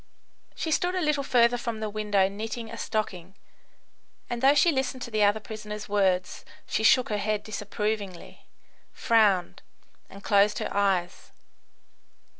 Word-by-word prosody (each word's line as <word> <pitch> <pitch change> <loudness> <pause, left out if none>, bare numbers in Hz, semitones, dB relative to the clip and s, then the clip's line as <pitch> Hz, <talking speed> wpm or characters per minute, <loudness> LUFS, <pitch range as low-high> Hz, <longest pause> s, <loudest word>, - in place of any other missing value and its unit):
She 320 - -3
stood 355 +4 +1
a - - 0
little 300 -4 +1
further 245 -2 +3
from 235 -2 -4
the 215 - -3
window 205 -2 +1
knitting 220 +3 -6
a 230 - -7
stocking, 195 -4 -4 1.0
and 240 -1 -3
though 275 +2 +5
she 340 +3 +4
listened 265 -2 -2
to 235 - -8
the 215 -1 0
other 205 +1 +3
prisoners' 210 -1 -8
words 190 -3 0 0.2
she - - -2
shook 250 +3 +4
her 210 -1 -1
head 210 +1 -1
disapprovingly, 210 -2 -5 0.4
frowned, 210 -7 +2 0.5
and 200 +1 -13
closed 205 0 +3
her - - -4
eyes. 190 -3 -1
215 Hz, 145 wpm, -26 LUFS, 200-235 Hz, 1.0 s, though